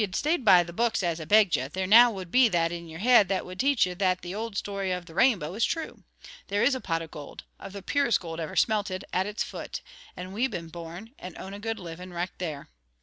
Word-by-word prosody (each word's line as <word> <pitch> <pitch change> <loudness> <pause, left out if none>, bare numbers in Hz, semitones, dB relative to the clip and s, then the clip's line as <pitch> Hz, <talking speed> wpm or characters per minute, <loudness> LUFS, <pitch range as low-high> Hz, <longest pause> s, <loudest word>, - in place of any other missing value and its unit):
If - - 0
ye'd 185 - -8
stayed 305 - 0
by 185 -5 +7
the 170 0 -10
books, 230 0 0
as 170 -2 -1
I - - -6
begged 205 -1 +5
ye, 130 - -2
there 185 +6 -3
now 235 +5 +8
would 190 -6 -7
be 255 -1 +6
that 170 -3 +1
in 170 0 -6
your 165 +2 -8
heid 240 -3 +6
that 190 -1 -1
would 180 0 -10
teach 275 -4 +3
ye 180 - -4
that 185 0 0
the 175 +1 -6
old 220 0 -4
story 195 -2 -2
of 180 -1 -3
the 165 - -13
Rainbow 185 - +2
is 220 +3 -1
true. 325 -1 -2 0.5
There 205 +1 0
is 280 - +4
a 260 - -3
pot 165 -2 -2
of 160 - -11
gold, 145 -1 -9 0.2
of 195 - -9
the 200 -1 -8
purest 280 -4 +2
gold 165 -3 -7
ever 160 -2 -5
smelted, 205 -4 0
at 185 +2 +1
its 210 0 -2
foot, - - -7 0.4
and 185 +1 -7
we've 245 +6 0
been 170 -7 -6
born, 170 +6 -9
and 180 -2 -9
own 190 - -8
a 200 - -7
good 225 +1 -3
living 180 -1 -8
richt 175 +1 -5
there. 155 -6 -5
185 Hz, 260 wpm, -27 LUFS, 170-220 Hz, 0.5 s, now